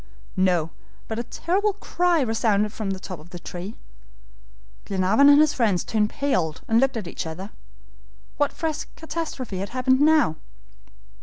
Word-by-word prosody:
No; 180 Hz, -4 st, +2 dB, 0.4 s
but 220 Hz, 0 st, -3 dB
a -, -, -1 dB
terrible 380 Hz, -, 0 dB
cry 355 Hz, -4 st, +1 dB
resounded 220 Hz, -3 st, +1 dB
from 215 Hz, -3 st, -4 dB
the 190 Hz, -1 st, -3 dB
top 185 Hz, -3 st, -7 dB
of 155 Hz, +3 st, -15 dB
the 175 Hz, -, -8 dB
tree. 180 Hz, +4 st, -7 dB, 1.1 s
Glenarvan 195 Hz, +9 st, +4 dB
and 285 Hz, 0 st, +8 dB
his 305 Hz, -1 st, +4 dB
friends 215 Hz, -, +1 dB
turned 210 Hz, -1 st, +1 dB
pale 185 Hz, -, 0 dB
and 225 Hz, +1 st, +4 dB
looked 265 Hz, -1 st, +2 dB
at 210 Hz, -6 st, -5 dB
each 170 Hz, -, -5 dB
other. 185 Hz, +6 st, -7 dB, 0.9 s
What 290 Hz, -1 st, +2 dB
fresh 315 Hz, -2 st, -3 dB
catastrophe 305 Hz, -, -5 dB
had 195 Hz, -, -4 dB
happened 260 Hz, +1 st, +2 dB
now? 305 Hz, -, +4 dB
225 Hz, 155 wpm, -24 LUFS, 190-290 Hz, 1.1 s, and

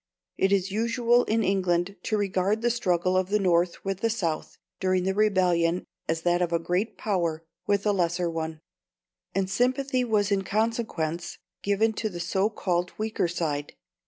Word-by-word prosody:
It 195 Hz, -, +2 dB
is 195 Hz, -1 st, +2 dB
usual 235 Hz, +3 st, +2 dB
in 225 Hz, +1 st, +1 dB
England 185 Hz, -1 st, +1 dB
to 215 Hz, -, +1 dB
regard 200 Hz, +2 st, 0 dB
the 240 Hz, -, +3 dB
struggle 185 Hz, -5 st, +1 dB
of 185 Hz, 0 st, +1 dB
the 210 Hz, -, +3 dB
North 175 Hz, -3 st, +1 dB
with 195 Hz, -1 st, -2 dB
the 230 Hz, -, +1 dB
South 170 Hz, -8 st, -2 dB, 0.2 s
during 185 Hz, -1 st, +1 dB
the 190 Hz, +1 st, +1 dB
Rebellion 180 Hz, -4 st, +2 dB, 0.2 s
as 165 Hz, 0 st, -1 dB
that 175 Hz, 0 st, +2 dB
of 175 Hz, -1 st, 0 dB
a 170 Hz, -, +3 dB
great 180 Hz, +6 st, -1 dB
power 170 Hz, -6 st, -1 dB, 0.2 s
with 200 Hz, 0 st, +1 dB
a 210 Hz, -, +4 dB
lesser 175 Hz, -2 st, +1 dB
one, 160 Hz, -1 st, -4 dB, 0.7 s
and 195 Hz, -1 st, +1 dB
sympathy 255 Hz, +5 st, +1 dB
was 210 Hz, -4 st, +1 dB
in 195 Hz, -1 st, +2 dB
consequence 205 Hz, -7 st, -1 dB, 0.2 s
given 210 Hz, +2 st, +2 dB
to 215 Hz, 0 st, -2 dB
the 175 Hz, -3 st, -7 dB
so 190 Hz, +4 st, +1 dB
called 180 Hz, -4 st, -1 dB
weaker 215 Hz, -4 st, 0 dB
side. 150 Hz, -4 st, -3 dB
190 Hz, 170 wpm, -27 LUFS, 175-215 Hz, 0.7 s, a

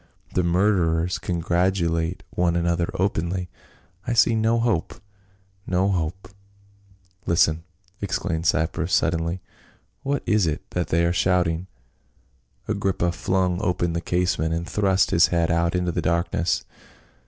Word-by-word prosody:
The 90 Hz, -, +2 dB
murderers 90 Hz, -2 st, +1 dB
congratulate 85 Hz, -1 st, 0 dB
one 85 Hz, -1 st, +1 dB
another 85 Hz, 0 st, 0 dB
openly. 90 Hz, -1 st, -1 dB, 0.6 s
I 120 Hz, -, 0 dB
see 115 Hz, 0 st, +4 dB
no 110 Hz, +1 st, +2 dB
hope 115 Hz, -8 st, 0 dB, 0.4 s
— -, -, -34 dB, 0.3 s
no 95 Hz, +2 st, +1 dB
hope." 90 Hz, 0 st, -2 dB, 1.0 s
"Listen!" 85 Hz, -1 st, +3 dB, 0.4 s
exclaimed 90 Hz, -4 st, -2 dB
Cypros 80 Hz, +3 st, 0 dB
suddenly, 85 Hz, +1 st, +1 dB, 0.6 s
"What 140 Hz, 0 st, -1 dB
is 105 Hz, -5 st, +2 dB
it 75 Hz, +2 st, -3 dB
that 90 Hz, -1 st, -1 dB
they 85 Hz, +1 st, +2 dB
are 85 Hz, -, +1 dB
shouting?" 90 Hz, -1 st, +1 dB, 1.0 s
Agrippa 95 Hz, -4 st, 0 dB
flung 90 Hz, +1 st, 0 dB
open 85 Hz, -3 st, 0 dB
the 85 Hz, -, -2 dB
casement 90 Hz, -2 st, 0 dB
and 85 Hz, +1 st, -4 dB
thrust 95 Hz, -2 st, +2 dB
his 85 Hz, -, +5 dB
head 85 Hz, -2 st, +1 dB
out 85 Hz, +1 st, +1 dB
into 90 Hz, -1 st, 0 dB
the -, -, -2 dB
darkness. 85 Hz, +1 st, 0 dB
90 Hz, 130 wpm, -24 LUFS, 85-95 Hz, 1.0 s, his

